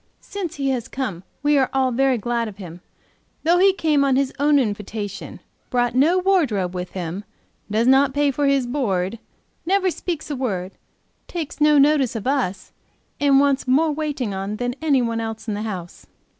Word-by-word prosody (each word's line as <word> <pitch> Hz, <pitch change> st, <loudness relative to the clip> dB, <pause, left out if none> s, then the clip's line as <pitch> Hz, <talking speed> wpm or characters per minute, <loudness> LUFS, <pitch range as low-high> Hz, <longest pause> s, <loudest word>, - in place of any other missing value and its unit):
Since 370 Hz, -5 st, -5 dB
he 275 Hz, -1 st, -1 dB
has 245 Hz, -3 st, -2 dB
come, 220 Hz, -11 st, -4 dB, 0.2 s
we 290 Hz, -1 st, +4 dB
are 260 Hz, -, +2 dB
all 265 Hz, -1 st, +2 dB
very 265 Hz, +1 st, +2 dB
glad 235 Hz, +1 st, -1 dB
of 210 Hz, -2 st, -9 dB
him, 175 Hz, -3 st, -10 dB, 0.6 s
though 345 Hz, +2 st, +4 dB
he 390 Hz, +1 st, +6 dB
came 310 Hz, -6 st, +1 dB
on 270 Hz, -2 st, +2 dB
his 270 Hz, 0 st, 0 dB
own 290 Hz, 0 st, +4 dB
invitation, 210 Hz, -4 st, -3 dB, 0.3 s
brought 245 Hz, -2 st, +1 dB
no 300 Hz, +8 st, +4 dB
wardrobe 290 Hz, -, +1 dB
with 180 Hz, 0 st, -5 dB
him, 180 Hz, +2 st, -4 dB, 0.5 s
does 220 Hz, +3 st, +1 dB
not 270 Hz, +2 st, +5 dB
pay 290 Hz, -1 st, +2 dB
for 285 Hz, +1 st, 0 dB
his 275 Hz, -2 st, +2 dB
board, 225 Hz, -6 st, -1 dB, 0.4 s
never 375 Hz, +1 st, +2 dB
speaks 330 Hz, -3 st, -5 dB
a -, -, -1 dB
word, 195 Hz, -8 st, -3 dB, 0.6 s
takes 320 Hz, -4 st, -6 dB
no 300 Hz, 0 st, +5 dB
notice 280 Hz, -4 st, +3 dB
of 220 Hz, -, -4 dB
us, 250 Hz, -9 st, -1 dB, 0.5 s
and 280 Hz, -1 st, +4 dB
wants 280 Hz, -1 st, +2 dB
more 305 Hz, +5 st, +3 dB
waiting 290 Hz, -8 st, -3 dB
on 195 Hz, +2 st, -3 dB
than 245 Hz, +2 st, -2 dB
any 280 Hz, -5 st, +2 dB
one 230 Hz, -1 st, -1 dB
else 225 Hz, 0 st, -6 dB
in 215 Hz, -, -1 dB
the 205 Hz, -, -3 dB
house. 185 Hz, -6 st, -6 dB
260 Hz, 185 wpm, -22 LUFS, 215-290 Hz, 0.6 s, he